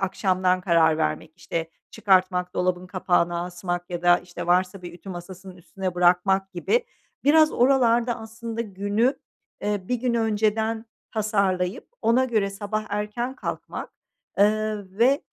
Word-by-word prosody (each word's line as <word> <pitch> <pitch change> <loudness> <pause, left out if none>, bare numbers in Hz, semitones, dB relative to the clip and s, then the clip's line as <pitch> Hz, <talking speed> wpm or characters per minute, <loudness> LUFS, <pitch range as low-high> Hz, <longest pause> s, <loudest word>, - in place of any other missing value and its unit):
akşamdan 185 -1 +1
karar 165 -3 +3
vermek, 155 0 -2
işte, 165 -1 -4 0.2
çıkartmak, 185 -2 +2
dolabın 180 0 0
kapağına 175 -2 0
asmak 175 0 -4
ya 175 0 -4
da, 175 0 +6
işte, 175 -1 -8
varsa 180 +2 +1
bir 175 -1 -8
ütü 180 +3 -13
masasının 185 +1 -9
üstüne 185 +1 -5
bırakmak 180 +2 +3
gibi. 470 - 0 0.4
Biraz 310 +1 +5
oralarda 240 -2 +3
aslında 225 +1 -6
günü, 205 +4 0 0.5
eee, 205 -3 -2
1 250 - +1
gün 240 0 -1
önceden 220 0 0 0.3
tasarlayıp 200 -4 0
ona 240 +3 +4
göre 215 -5 0
sabah 205 +2 -3
erken 210 +5 -3
kalkmak, - - -6 0.5
ııı, 215 -1 +1
ve 265 +5 +4
195 Hz, 135 wpm, -24 LUFS, 180-220 Hz, 0.5 s, da